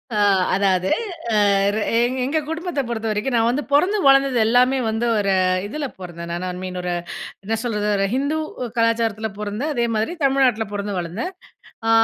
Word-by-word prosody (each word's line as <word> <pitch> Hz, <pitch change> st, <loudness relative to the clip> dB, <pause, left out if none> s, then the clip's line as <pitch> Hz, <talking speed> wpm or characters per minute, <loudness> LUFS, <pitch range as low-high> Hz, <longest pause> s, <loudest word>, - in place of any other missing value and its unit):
அ, -, -, 0 dB, 0.4 s
அதாவது 190 Hz, -1 st, +1 dB, 0.4 s
அ -, -, +4 dB, 0.4 s
ர -, -, -1 dB, 0.2 s
எங் 245 Hz, +2 st, +1 dB
எங்க 300 Hz, +4 st, +1 dB
குடும்பத்த 325 Hz, -2 st, -2 dB
பொறுத்தவரைக்கும் 225 Hz, +2 st, -1 dB
நான் 230 Hz, 0 st, +3 dB
வந்து 270 Hz, +5 st, 0 dB
பொறந்து 365 Hz, +9 st, +4 dB
வளர்ந்தது 275 Hz, -1 st, +5 dB
எல்லாமே 250 Hz, +3 st, +4 dB
வந்து 225 Hz, +2 st, -1 dB
ஒரு 200 Hz, -2 st, +1 dB, 0.3 s
இதில 290 Hz, +6 st, -4 dB
பொறந்தேன். 170 Hz, -2 st, -7 dB
நான் 175 Hz, +2 st, -3 dB
ஐ -, -, -2 dB
மீன் 185 Hz, -1 st, -4 dB
ஒரு 180 Hz, 0 st, -2 dB, 0.5 s
என்ன 225 Hz, +3 st, -1 dB
சொல்றது 210 Hz, -3 st, -1 dB
ஒரு 195 Hz, -, +1 dB
ஹிந்து 280 Hz, +4 st, 0 dB, 0.4 s
கலாச்சாரத்தில 230 Hz, -1 st, +1 dB
பொறந்தேன். 210 Hz, +9 st, -3 dB
அதே 235 Hz, -2 st, +1 dB
மாதிரி 220 Hz, +11 st, -1 dB
தமிழ்நாட்டில 260 Hz, -5 st, +3 dB
பொறந்து, 200 Hz, -1 st, -3 dB
வளர்ந்தேன். 180 Hz, -, -4 dB, 0.6 s
அ. -, -, +2 dB
225 Hz, 165 wpm, -21 LUFS, 205-270 Hz, 0.6 s, வளர்ந்தது